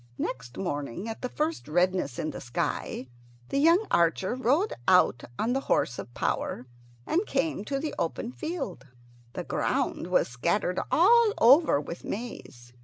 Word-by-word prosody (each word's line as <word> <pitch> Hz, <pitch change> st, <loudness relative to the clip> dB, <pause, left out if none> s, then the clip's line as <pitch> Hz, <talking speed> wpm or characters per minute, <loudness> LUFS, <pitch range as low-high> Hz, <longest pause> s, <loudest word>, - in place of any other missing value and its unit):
Next 120 Hz, 0 st, -5 dB
morning, 160 Hz, -, -3 dB
at 225 Hz, -, -6 dB
the 250 Hz, -, -3 dB
first 315 Hz, +4 st, -2 dB
redness 175 Hz, -4 st, +1 dB
in 155 Hz, -, -2 dB
the -, -, -8 dB
sky, 120 Hz, +1 st, -3 dB, 0.4 s
the 275 Hz, -, 0 dB
young 335 Hz, +8 st, +5 dB
archer 170 Hz, +5 st, +2 dB
rode 265 Hz, -, +1 dB
out 180 Hz, -9 st, +4 dB
on 230 Hz, +3 st, 0 dB
the 270 Hz, -, +1 dB
horse 125 Hz, -, +1 dB
of -, -, -7 dB
power, 125 Hz, -, -2 dB, 0.4 s
and 350 Hz, +5 st, +1 dB
came 315 Hz, -11 st, -1 dB
to 275 Hz, -, -2 dB
the 300 Hz, +2 st, -3 dB
open 230 Hz, +8 st, -2 dB
field. 270 Hz, -, -5 dB, 0.5 s
The -, -, -4 dB
ground -, -, -1 dB
was -, -, +2 dB
scattered 170 Hz, +9 st, 0 dB
all 440 Hz, +5 st, +5 dB
over 270 Hz, -, +6 dB
with 170 Hz, +4 st, -7 dB
maize. 135 Hz, -, -7 dB
205 Hz, 155 wpm, -28 LUFS, -, 0.5 s, over